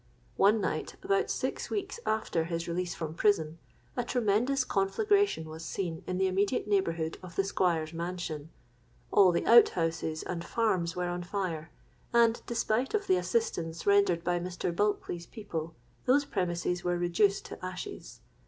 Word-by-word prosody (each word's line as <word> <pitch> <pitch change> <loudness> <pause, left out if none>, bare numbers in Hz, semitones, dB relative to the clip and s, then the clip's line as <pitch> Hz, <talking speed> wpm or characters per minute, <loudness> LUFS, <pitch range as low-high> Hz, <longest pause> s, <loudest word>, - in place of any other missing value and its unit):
One 210 +3 +5
night, 190 - -2
about 395 +1 +1
six - - -2
weeks 400 +2 -3
after 215 -7 0
his 165 0 -3
release 175 +1 -2
from 160 -2 -4
prison, 165 -4 +1 0.4
a 245 - 0
tremendous 245 +3 +1
conflagration 395 - +1
was 160 +1 -8
seen 165 -2 -4
in 180 - -2
the 190 - +2
immediate 200 +5 +1
neighbourhood 165 -6 0
of 180 -2 -10
the 195 - +2
Squire's 170 -5 0
mansion: 170 -3 -4 0.6
all 190 -3 +6
the 170 - 0
out 235 +1 +8
houses 165 -1 -1
and 170 -2 -4
farms 185 -5 0
were 180 0 -1
on 175 0 -3
fire; 175 -4 -3 0.4
and, 235 -1 +4
despite 235 - 0
of 415 -1 0
the 375 -1 +3
assistance 170 - -1
rendered 200 -4 +4
by 175 0 +1
Mr. 175 -1 -3
Bulkeley's 175 -4 -1
people, 165 -8 -6 0.3
those 280 +3 +4
premises 180 -4 -1
were 175 0 0
reduced 175 +3 +2
to - - -9
ashes. 185 -1 -7
180 Hz, 155 wpm, -30 LUFS, 170-215 Hz, 0.6 s, out